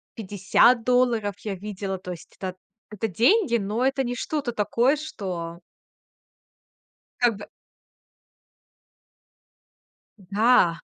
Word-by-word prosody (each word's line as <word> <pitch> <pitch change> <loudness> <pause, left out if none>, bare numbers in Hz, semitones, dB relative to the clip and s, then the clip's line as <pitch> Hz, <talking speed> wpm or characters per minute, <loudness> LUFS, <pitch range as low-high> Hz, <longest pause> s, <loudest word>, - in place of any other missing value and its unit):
50 205 +4 +3
долларов 235 -5 +2
я 205 -3 -4
видела. 195 0 -5
То 180 0 -7
есть 175 - -11
это 185 -1 -4
т - - -35 0.3
это 210 +1 -2
деньги, 235 - +3
но 215 +5 -1
это 270 0 +1
не 245 0 -3
что-то 285 -2 -3
такое, 235 +6 +2
что 185 - -6 1.6
Как 235 -4 +2
бы 205 - -9 2.7
Да. 195 -4 +3
210 Hz, 105 wpm, -25 LUFS, 190-245 Hz, 2.7 s, 50